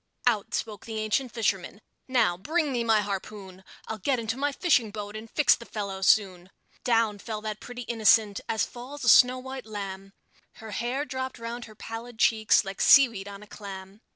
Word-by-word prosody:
Out 225 -5 +1
spoke 215 -2 -5
the 220 -1 -5
ancient 215 +4 -1
fisherman: 200 -4 -2 0.3
"Now, 240 -9 +2
bring 305 - -1
me 240 -2 0
my 220 -2 +3
harpoon! 195 -1 -6 0.2
I'll 220 - -5
get 260 +7 +1
into 225 -1 -2
my 290 +2 -1
fishing 275 - +2
boat, 205 0 -7
and 220 +1 -8
fix 300 - +4
the - - -6
fellow 200 -4 -5
soon." 190 -3 +2 0.3
Down 225 -4 +2
fell 215 0 -5
that 215 -1 -5
pretty 245 0 -8
innocent, 220 -2 +3
as 220 -4 +1
falls 260 +4 -9
a 240 - +3
snow 250 +3 +7
white 260 -2 -8
lamb; 195 -2 -7 0.4
Her 220 -1 -10
hair 245 +7 -2
drooped 260 -2 -5
round 235 +1 -6
her 215 - -14
pallid 225 +2 -8
cheeks, 220 -1 +3
like 195 0 -5
seaweed 230 -8 +6
on 200 0 -9
a - - -15
clam. 195 0 -10
220 Hz, 185 wpm, -27 LUFS, 205-245 Hz, 0.4 s, snow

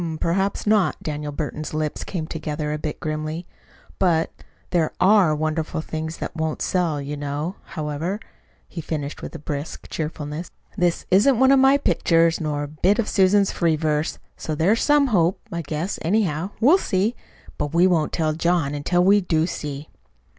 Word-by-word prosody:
"Hm 165 -2 -3
m; - - -5
perhaps 190 +5 0
not." 210 -3 +3
Daniel 150 -1 -3
Burton's 155 +1 -4
lips 155 -1 -2
came 170 -5 -4
together 150 -1 -3
a 150 - -3
bit 150 0 -4
grimly. 155 +2 -3 0.5
"But 165 -4 +2 0.4
there 165 -3 +1
ARE 185 -4 +5
wonderful 155 +1 -2
things 160 0 -5
that - - -5
won't 160 -1 -2
sell, 170 -5 0
you 140 +1 -4
know. 145 +5 -4
However," 155 +5 -3 0.5
he 170 - -6
finished 150 -2 -4
with 150 - -8
brisk 145 +1 -5
cheerfulness, 155 +1 -4 0.3
"this 175 -1 0
isn't 225 +8 +5
one 265 0 +6
of 275 - +6
my 270 +1 +6
pictures, 165 -11 +2
nor 150 -2 -1
a - - -4
bit 175 +8 +1
of 230 - 0
Susan's 195 +1 +3
free 165 -3 +1
verse; 155 0 -1 0.2
so 155 - -4
there's 190 +9 +2
some 295 -1 +4
hope, 185 -8 +2
I 170 - -2
guess. 160 +5 -3
Anyhow, 175 -1 0
we'll 295 - +6
see 205 - 0 0.4
but 150 -1 -1
we 170 +2 +4
won't 170 -5 +2
tell 155 -1 0
John 165 -2 +1
until 175 +5 +1
we 200 +2 +5
do 160 -3 +1
see." 150 -4 -5
165 Hz, 175 wpm, -23 LUFS, 150-185 Hz, 0.5 s, one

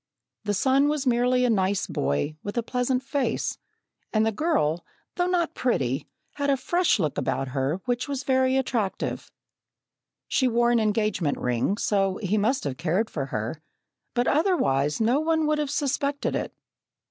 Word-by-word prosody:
The 205 0 0
son 270 +7 +3
was 300 -2 -1
merely 250 0 +3
a - - +2
nice 195 -2 +1
boy, 110 - -1
with 205 +3 -6
a 235 - +1
pleasant 250 +2 0
face, 265 -4 -1 0.5
and 215 0 +2
the 225 - +2
girl, 200 - 0 0.3
though 355 0 0
not 350 -2 0
pretty, 135 - -1 0.3
had 285 0 0
a 275 - +3
fresh 350 +4 +2
look 155 -8 -1
about 135 -1 -1
her 135 +7 -1
which 245 +3 -1
was 280 -1 -3
very 260 -1 +2
attractive. 235 -7 -2 1.0
She 260 - +2
wore 240 0 +3
an 240 - +4
engagement 210 -7 0
ring, 125 - 0
so 195 -3 +1
he 210 0 0
must 250 +6 +1
have 135 -3 -3
cared 180 +8 0
for 135 -4 -3
her, 115 +6 -4 0.5
but 245 +1 +1
otherwise 150 - +2
no 235 +5 +3
one 320 0 +1
would 300 0 +1
have 295 -2 -1
suspected 285 0 -1
it. - - -2
235 Hz, 165 wpm, -26 LUFS, 185-275 Hz, 1.0 s, an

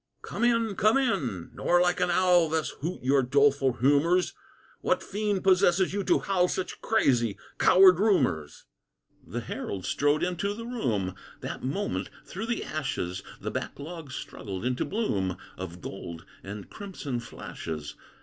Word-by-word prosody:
"Come - - -4
in! 230 -3 +3
come 215 +6 +4
in! 130 - -1
nor 175 - +2
like 180 0 +2
an - - +2
owl 175 -2 +4
Thus 160 0 0
hoot 165 0 -4
your 135 +1 +4
doleful 140 0 +3
humors; 145 +8 +3 0.5
What - - +1
fiend 205 -2 -1
possesses 185 -1 +4
you 200 0 -1
to - - +4
howl 185 -2 +2
Such 185 0 -4
crazy, 120 - +2 0.2
coward 185 -1 +7
rumors?" 130 - +1 0.6
The - - -5
herald 95 -2 -5
strode 145 +1 +2
into 180 +3 -1
the 230 +1 -7
room; 115 - -1 0.3
That - - -5
moment, 195 +11 -2 0.2
through 195 +5 -5
the 235 -1 -1
ashes, 95 - -3 0.2
The - - -4
back - - -4
log 155 -1 -8
struggled 100 -5 -6
into 125 0 0
bloom 100 - -1 0.2
Of 90 -1 -7
gold 85 -1 -7 0.2
and 100 +1 -7
crimson 175 - -5
flashes. 80 -9 -6
160 Hz, 150 wpm, -28 LUFS, 120-195 Hz, 0.6 s, coward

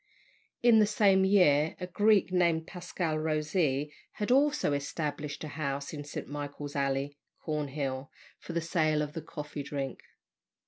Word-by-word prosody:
In 235 -2 +7
the 210 - +5
same 200 -3 +4
year, 160 -6 +4
a 180 - -3
Greek 205 +1 +3
named 170 -3 +2
Pasqua 175 -3 -3
Rosee 150 -2 0 0.2
had 210 +3 -2
also 285 - +3
established 145 +1 -3
a - - -4
house 140 -2 -3
in 145 -1 -5
St. 145 - -6
Michael's 145 0 -6
Alley, 140 +1 -1 0.2
Cornhill, 140 -3 -3 0.3
for 170 - -8
the 170 - 0
sale 155 -2 +1
of 150 0 -6
"the 165 - -4
coffee 150 -1 -6
drink." 140 -2 -4
155 Hz, 145 wpm, -30 LUFS, 145-180 Hz, 0.3 s, In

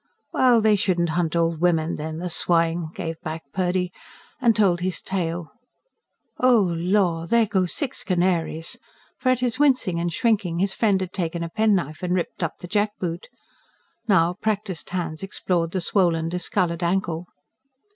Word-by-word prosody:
"Well, 245 -3 +5
they 215 -1 +4
shouldn't 175 -3 +1
hunt 165 0 0
old 165 -1 +1
women, 170 -2 +2
then 155 +1 -5
the 180 +2 -4
swine!" 165 -1 +1
gave 165 0 -5
back 160 +1 -5
Purdy; 180 -1 0 0.5
and 235 -3 +4
told 195 -5 +3
his 180 -1 -2
tale. 175 -3 -3 0.9
"Oh, 225 -9 +4
lor! 175 -1 +1
there 230 +2 +4
go 190 -4 +1
six 270 - -3
canaries." 175 -3 0 0.4
For, 255 - +1
at 255 -1 +2
his 245 0 0
wincing 255 -12 +3
and 170 0 -1
shrinking, 200 -3 +1
his 190 +2 +1
friend 205 -4 +2
had 185 -1 -4
taken 170 -2 -2
a 165 - -4
penknife 190 -6 +1
and 180 0 0
ripped 180 0 -3
up 170 - -2
the 180 - -6
jackboot. 195 -3 -2 0.8
Now, 175 -4 +4
practised 205 -4 -3
hands 165 -4 -3
explored 180 -3 -1
the 185 +2 -2
swollen, 165 -3 +2
discoloured 180 -1 -1
ankle. 175 -1 -1
180 Hz, 155 wpm, -24 LUFS, 165-200 Hz, 0.9 s, Well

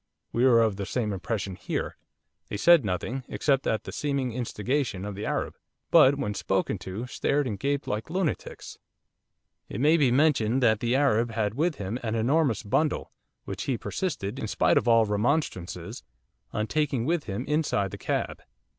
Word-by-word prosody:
We 120 +2 +2
were 115 -3 +6
of 110 -3 0
the 100 -1 -4
same 110 -5 -1
impression 95 0 -3
here. - - -3 0.5
They 105 - -3
said 170 +5 +6
nothing, 110 +7 -3
except 135 -2 +1
at 110 -1 0
the - - -7
seeming 140 -4 -1
instigation 120 -3 -2
of 105 - -4
the 100 +2 -5
Arab, - - -2 0.4
but 135 +2 +7
when 105 -7 -2
spoken - - -1
to 95 +6 -5
stared 140 +3 0
and 105 -6 -3
gaped 140 +4 -1
like 105 +5 -3
lunatics. 180 -2 -3 0.9
'It 100 - -5
may 155 +5 +5
be 140 -5 +4
mentioned 130 -3 +3
that 110 -3 +4
the 120 +2 +1
Arab 120 -4 +3
had 105 -2 0
with 155 +5 0
him 105 +3 -4
an 115 -1 -2
enormous 130 +2 +2
bundle, 150 +9 0 0.3
which - - -5
he 130 -4 0
persisted, 150 - -3
in - - -3
spite - - +3
of - - -6
all 115 -1 +5
remonstrances, 105 - -1 0.5
on 105 - -1
taking 140 -3 0
with 165 +1 0
him 100 -1 -4
inside 150 - 0
the 100 - -6
cab. - - -2
120 Hz, 175 wpm, -27 LUFS, 105-140 Hz, 0.9 s, but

